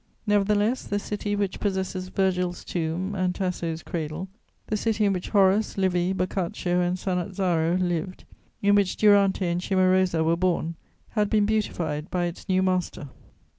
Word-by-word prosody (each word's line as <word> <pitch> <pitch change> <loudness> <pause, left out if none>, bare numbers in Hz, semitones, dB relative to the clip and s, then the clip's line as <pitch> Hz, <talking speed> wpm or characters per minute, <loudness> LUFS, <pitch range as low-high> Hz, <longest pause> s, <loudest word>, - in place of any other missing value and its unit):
Nevertheless, 210 +3 +2
the 205 - -1
city 205 0 -3
which 200 -2 -2
possesses 190 -2 -2
Virgil's 180 -2 -1
tomb 175 +3 -2
and 185 -2 0
Tasso's 170 -4 -3
cradle, 165 +3 -4 0.4
the 215 - -2
city 215 0 +1
in 200 - +3
which 180 -1 -4
Horace, 200 +1 +3
Livy, 180 -1 +1
Boccaccio 180 -1 -1
and 180 +1 0
Sannazaro 180 -2 0
lived, 180 +1 -2 0.4
in 200 0 +5
which 200 -2 +2
Durante 200 -2 +4
and 175 0 0
Cimarosa 185 -3 +2
were 165 +1 +2
born, 170 -2 0 0.4
had 210 -2 0
been 210 -1 +3
beautified 170 -8 -1
by 175 -1 0
its 175 +2 -7
new 185 0 +3
master. 185 -5 -1
185 Hz, 150 wpm, -25 LUFS, 175-200 Hz, 0.4 s, in